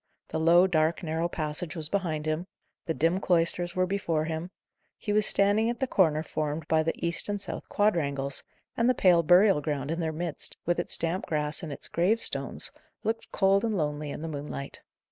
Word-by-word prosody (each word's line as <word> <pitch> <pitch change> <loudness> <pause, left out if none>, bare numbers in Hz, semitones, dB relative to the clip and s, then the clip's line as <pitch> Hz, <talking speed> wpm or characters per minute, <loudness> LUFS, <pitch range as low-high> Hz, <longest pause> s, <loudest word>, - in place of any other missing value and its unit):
The 160 - -2
low, 170 +3 +6
dark, 165 -1 +1
narrow 165 +1 -1
passage 155 +2 -3
was 160 -3 -2
behind 160 -4 -2
him; 155 +3 -2 0.4
the 165 - +1
dim 165 +4 +2
cloisters 175 -1 +1
were 185 0 +2
before 170 -5 -1
him; 160 +2 -4 0.5
he 210 - -3
was 210 -1 +3
standing 205 +3 +3
at 240 - -3
the 265 - +1
corner 160 - +2
formed 155 -1 -3
by 160 0 +3
the 165 +2 -2
east 170 +4 +2
and 205 0 -1
south - - -4
quadrangles, 140 -9 0 0.3
and 235 +1 +2
the 255 - +3
pale 180 -5 +5
burial 180 +1 +5
ground 145 -1 -2
in 165 - -2
their 160 -2 -1
midst, 165 0 -3
with 175 0 +1
its 175 - +1
damp 175 +5 -2
grass 150 -1 -1
and 160 - -6
its 140 - -7
gravestones, 200 +7 0 0.3
looked 225 +1 -3
cold 195 +1 +3
and 220 -3 0
lonely 150 -2 -2
in 150 - -6
the - - -3
moonlight. 145 -2 -6
170 Hz, 195 wpm, -28 LUFS, 155-190 Hz, 0.5 s, low